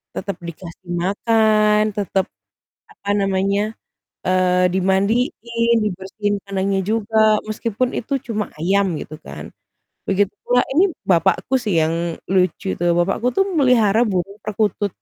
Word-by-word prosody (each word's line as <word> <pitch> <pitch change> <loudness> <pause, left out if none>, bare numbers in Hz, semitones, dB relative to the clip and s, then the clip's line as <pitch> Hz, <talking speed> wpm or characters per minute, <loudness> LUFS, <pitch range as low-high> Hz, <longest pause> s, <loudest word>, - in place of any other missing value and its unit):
tetap 200 -3 -4
dikasih 170 +1 -10
makan, 215 +1 +3 0.2
tetap 195 -1 0 0.7
apa 200 - -9
namanya, 195 0 +1 0.6
eee, 180 0 +2
dimandiin, 230 +5 +1
dibersihin 205 +1 -2
kandangnya 195 0 0
juga 220 0 -1 0.3
meskipun 230 +3 -1
itu 250 - -6
cuma 215 -3 -2
ayam 195 +5 +2
gitu 155 - -8
kan. - - -8 0.6
Begitu 200 +1 +1
pula 245 0 +2
ini 355 +8 +4 0.2
bapakku 180 +8 +2
sih 210 -6 -1
yang 165 +1 -2 0.2
lucu 185 0 +1
itu. - - -7 0.2
Bapakku 195 +7 +1
tuh 390 - +4
memelihara 250 - +3
burung 195 +2 -3
perkutut. 210 -1 -1
200 Hz, 120 wpm, -20 LUFS, 190-225 Hz, 0.7 s, ini